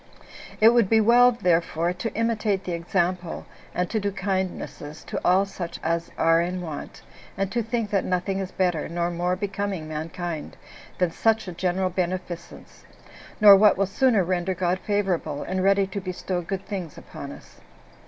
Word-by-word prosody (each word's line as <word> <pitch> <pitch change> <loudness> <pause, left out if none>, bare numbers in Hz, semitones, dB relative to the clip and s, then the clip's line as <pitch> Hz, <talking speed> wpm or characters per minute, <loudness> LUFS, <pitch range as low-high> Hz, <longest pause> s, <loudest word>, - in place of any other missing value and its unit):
It 220 - +8
would 235 -4 +3
be 225 - +5
well 240 +3 +6
therefore 175 -5 +1
to 210 +5 -4
imitate 215 -3 0
the 185 - -4
example 175 0 -1 0.3
and 180 0 0
to 220 - +1
do 200 0 -1
kindnesses 185 -6 -4
to - - -5
all 190 +2 +4
such 180 -3 -6
as 170 +1 -1
are 165 0 +4
in 180 +2 -2
want 160 -5 -7 0.3
and 195 0 -1
to 240 - 0
think 225 -1 -2
that 200 -2 +2
nothing 185 +1 -1
is 190 -1 -4
better, 175 -6 0
nor 170 +1 -1
more 175 +1 0
becoming 195 -3 -3
mankind, 160 +1 -5 0.4
than 180 -2 +1
such 225 +3 +1
a - - -4
general 185 +1 0
beneficence, 180 -1 -5 0.6
nor 205 -2 +10
what 205 0 +5
will 195 - +2
sooner 220 +1 +2
render 180 +1 -1
God 180 +1 0
favorable, 195 -8 -1
and 185 0 -2
ready 195 0 +4
to 195 +1 -5
bestow 185 0 -3
good 190 +3 -5
things 185 -7 -5
upon - - -9
us. - - -14
185 Hz, 170 wpm, -25 LUFS, 175-200 Hz, 0.6 s, nor